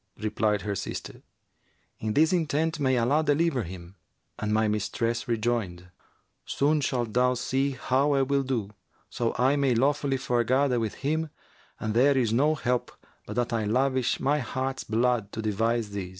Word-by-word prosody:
Replied 105 -2 0
her 105 - -2
sister, 100 - -6 0.8
"In 110 -1 -3
this 160 +4 +4
intent 160 -1 0
may 130 -2 +2
Allah 135 +7 +2
deliver 150 -2 +1
him!"; 90 0 -9 0.4
and 105 0 -2
my 110 +1 +2
mistress 115 +3 -1
rejoined, 110 -7 -2 0.5
'Soon 150 +2 +1
shalt 120 -5 -1
thou 125 +1 +3
see 135 +3 0
how 140 +3 +2
I 135 -1 +3
will 140 +1 +1
do, 120 -7 -2 0.4
so 115 -1 -1
I 130 +4 +3
may 135 -3 +2
lawfully 135 +2 +1
foregather 125 +1 +1
with 110 -2 -3
him 160 +2 0 0.5
and 110 0 -2
there 135 +4 +4
is 115 -4 +1
no 150 +6 +3
help 125 -3 -1 0.4
but - - -6
that 120 -1 -1
I 110 -2 0
lavish 130 +3 +1
my 145 +3 +1
heart's 130 +1 -3
blood 115 -2 0
to 110 - -4
devise 115 +1 0
this.' 100 -3 -4
125 Hz, 165 wpm, -27 LUFS, 110-140 Hz, 0.8 s, this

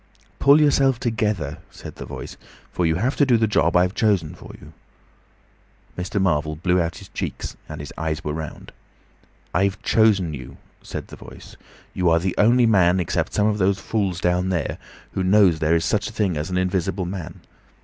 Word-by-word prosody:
"Pull 140 +2 +6
yourself 135 -4 +3
together," 105 - -2
said - - -11
the - - -8
Voice, - - -8 0.4
"for 90 - 0
you 80 - +1
have 120 +10 0
to - - +4
do 125 -4 +4
the 110 - +2
job 90 -5 +1
I've 90 +1 +2
chosen 100 -10 +1
for - - -13
you." - - -14 1.2
Mr. 95 +4 -3
Marvel 75 -5 +1
blew 90 +3 +1
out 85 0 -3
his - - -12
cheeks, - - -5
and - - -7
his 75 -2 -8
eyes 80 -1 -2
were 75 - -3
round. 80 -1 -7 0.8
"I've 95 +3 +1
chosen 100 -7 +3
you," 65 -1 -9 0.2
said - - -7
the - - -10
Voice. - - -13 0.4
"You 90 -2 +1
are 80 - +4
the 90 +1 -1
only 120 +3 +5
man 95 -5 +4
except 85 - -2
some 105 - +2
of 105 0 +1
those 95 0 +2
fools 100 -5 -2
down 90 +1 +1
there, 85 -6 -2 0.3
who 95 - -2
knows 95 -3 +4
there 80 +1 +2
is 80 - +1
such 105 +1 0
a - - -13
thing 105 -6 0
as 75 +3 -3
an 90 - -1
invisible 90 0 -1
man. 90 -2 -7
95 Hz, 190 wpm, -22 LUFS, 85-105 Hz, 1.2 s, Pull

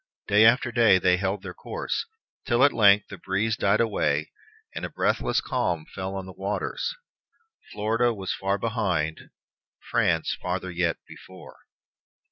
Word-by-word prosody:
Day 105 +2 +5
after 120 +2 +4
day 115 -5 +5
they 90 0 +3
held 95 +2 -2
their - - -7
course, - - -4 0.4
till 120 0 +3
at 145 - +5
length 105 -1 +5
the 100 - -9
breeze 105 +5 -1
died 100 -1 +2
away 115 -2 0 0.4
and - - -6
a - - -3
breathless - - 0
calm 90 -12 -1
fell 95 +1 -4
on 95 -1 -5
the 95 - -10
waters. 105 - -3 0.8
Florida 115 +3 +1
was 95 -4 -4
far 95 +1 -1
behind; 95 -9 -2 0.6
France - - +1
farther 90 0 -3
yet 85 -2 0
before. 95 0 -13
100 Hz, 145 wpm, -25 LUFS, 95-115 Hz, 0.8 s, Day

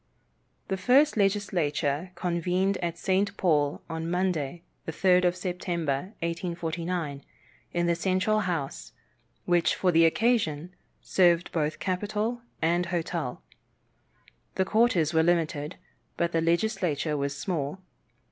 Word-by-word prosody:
The 190 - 0
first 265 +10 +4
legislature 180 -6 0
convened 180 +2 0
at 170 -1 -3
St. 195 +3 0
Paul 150 -5 +1
on 165 0 -4
Monday, 175 -3 -1 0.2
the - - -1
3d 180 +2 +3
of 175 0 +2
September, 175 -2 -2
1849, 170 -3 -3 0.5
in 175 0 0
the 170 - +3
Central 185 +4 +1
House, 170 -9 -3 0.5
which 175 -1 +2
for 185 - +2
the 165 0 +6
occasion 180 -5 +1 0.3
served 175 -2 +3
for 165 - -1
both 155 - -4
capitol 210 +5 -2 0.2
and 175 +2 +2
hotel. 170 -6 -3 1.1
The 190 - +1
quarters 190 -7 +2
were 160 - +4
limited, 160 -2 0 0.4
but 170 0 0
the 165 - +1
legislature 170 -3 0
was 140 0 -2
small. 145 0 -2
175 Hz, 120 wpm, -27 LUFS, 160-185 Hz, 1.1 s, the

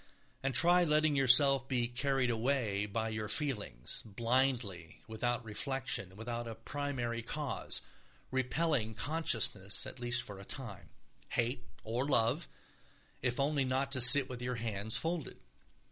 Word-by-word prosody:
And 135 -2 -3
try 175 +6 +4
letting 155 -2 +1
yourself 135 0 +5
be 125 -3 -1
carried 130 0 -1
away 115 -4 -1
by 110 +2 -3
your 110 -1 -5
feelings, 110 - +1
blindly, 115 -5 -2
without 120 +1 -3
reflection, 110 -4 -3
without 115 +2 -6
a 115 - -7
primary 120 -1 -4
cause, 145 +5 -3 0.5
repelling 130 -3 -1
consciousness 115 -10 +1
at 130 -1 -8
least 120 0 +1
for 100 -2 -9
a - - -10
time; 120 -3 -5 0.4
hate 125 +1 -2 0.2
or 120 +5 -3
love, 120 +5 +2 0.7
if 125 0 -1
only 140 0 0
not 130 +1 -2
to 130 -2 +2
sit 130 +2 +10
with 125 -2 -8
your 125 0 -3
hands 110 -2 -2
folded. 165 -2 -3
125 Hz, 135 wpm, -32 LUFS, 110-135 Hz, 0.7 s, sit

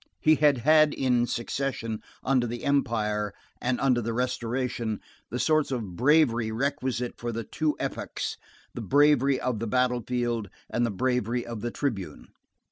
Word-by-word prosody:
He 155 - +5
had 145 -3 +4
had 155 +4 +5
in 125 -2 +2
succession, 120 -2 -3 0.2
under 130 -2 +2
the 120 +1 -5
Empire 105 -7 0 0.3
and 125 0 0
under 125 -3 +3
the 115 0 -2
Restoration, 120 -2 -2 0.3
the 120 - -3
sorts 155 +3 +2
of 110 -9 -3
bravery 120 - +3
requisite 130 0 -2
for 120 0 -3
the 115 0 -3
two 155 +6 -1
epochs, - - -3 0.4
the - - -5
bravery 140 -2 +4
of 125 -4 -1
the 115 - -3
battle 125 +1 +1
field 120 -3 -2 0.2
and 120 0 +1
the - - -2
bravery 125 +2 0
of 115 -3 -6
the 120 - -2
tribune. 100 - -4
125 Hz, 155 wpm, -27 LUFS, 115-135 Hz, 0.4 s, He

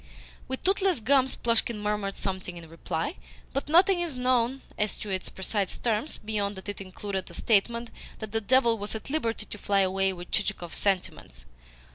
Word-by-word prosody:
With 260 0 -3
toothless 385 -4 +3
gums 265 +3 +3
Plushkin 230 -1 +1
murmured 210 -1 -1
something 185 -2 -4
in 165 -1 -9
reply, 165 - -3 0.4
but 275 +2 -2
nothing 360 +3 +6
is 325 -7 -3
known 250 +1 +2
as 210 0 0
to 210 - -5
its 185 -1 -2
precise 195 0 -1
terms 230 +5 -1
beyond 210 -1 -2
that 190 - -8
it 205 - -4
included 190 0 -4
a 170 - -10
statement 235 +4 +2 0.3
that 220 -2 -6
the 225 +1 +1
devil 235 0 +4
was 205 +2 -3
at 220 +4 -6
liberty 230 -7 -1
to - - -8
fly 200 0 +3
away 195 0 +2
with 175 -1 -9
Chichikov's 200 -5 -1
sentiments. 175 - -1
210 Hz, 175 wpm, -28 LUFS, 195-250 Hz, 0.4 s, nothing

